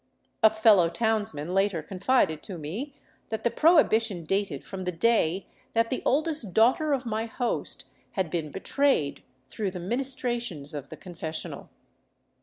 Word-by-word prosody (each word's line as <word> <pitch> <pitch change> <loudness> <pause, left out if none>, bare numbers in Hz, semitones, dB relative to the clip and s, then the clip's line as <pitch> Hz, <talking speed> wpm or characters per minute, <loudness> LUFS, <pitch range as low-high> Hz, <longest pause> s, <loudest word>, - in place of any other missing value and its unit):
A 220 - +8
fellow 215 -5 +5
townsman 205 -4 -1
later 195 -4 +1
confided 185 - +1
to 190 - -7
me 205 - -5 0.3
that 220 0 -4
the 235 - +2
prohibi 305 -5 +5
tion 195 -7 -4
dated 195 -5 -1
from 190 -1 -7
the 180 - 0
day 190 -1 +1 0.3
that 230 0 +1
the 255 - -1
oldest 295 - +1
daughter 255 +7 +4
of 265 -2 0
my 225 0 -2
host 240 +2 -2 0.3
had 185 -5 -1
been 165 -3 -2
betrayed 195 - 0 0.3
through 205 +5 -3
the 180 -1 -7
ministrations 240 - -1
of 140 -2 -6
the - - -9
confessional. 165 -3 -6
210 Hz, 150 wpm, -27 LUFS, 170-240 Hz, 0.3 s, A